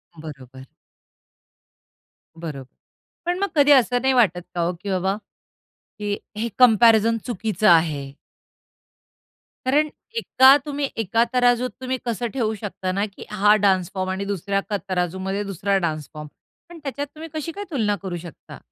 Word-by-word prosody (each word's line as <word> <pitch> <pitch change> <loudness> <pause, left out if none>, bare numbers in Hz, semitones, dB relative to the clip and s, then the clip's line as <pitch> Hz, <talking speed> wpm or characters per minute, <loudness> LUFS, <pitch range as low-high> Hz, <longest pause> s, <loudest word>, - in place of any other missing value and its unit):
बरोबर. 135 -5 -11 1.7
बरोबर. 150 -5 -7 0.6
पण 350 +1 -1
मग 400 - +1
कधी 290 -1 +5
असं 250 -2 +4
नाही 265 +1 +2
वाटत 205 -8 +3
का 175 - 0
हो, 170 +1 0
की 180 +4 -8
बाबा 190 +1 0 0.9
हे 205 0 -1 0.2
हे 230 +2 -2
कंपॅरिझन 230 -1 +6
चुकीचं 215 -4 -1
आहे? 155 -5 +2 1.5
कारण 295 +4 +2 0.3
एका 265 - +6
तुम्ही 285 -2 -2
एका 225 +1 +2
तराजूत 245 0 +3
तुम्ही 260 0 -2
कसं 240 0 -2
ठेवू 230 -5 0
शकता 195 -2 -4
ना 200 +2 0
की 200 -2 -11
हा 210 0 +4
डान्स 185 -3 +2
फॉर्म 185 -1 -2
आणि 190 +1 -3
दुसऱ्या 195 0 -1
क 205 - +1
तराजूमध्ये 190 +2 -2
दुसरा 195 0 -1
डान्स 155 -5 -2
फॉर्म? 150 -1 -8 0.4
पण 345 -1 -11
त्याच्यात 285 +1 -4
तुम्ही 320 +1 -8
कशी 310 +1 -4
काय 405 +5 -6
तुलना 215 -8 +1
करू 185 -3 -4
शकता? 170 -2 -11
205 Hz, 145 wpm, -22 LUFS, 180-250 Hz, 1.7 s, कंपॅरिझन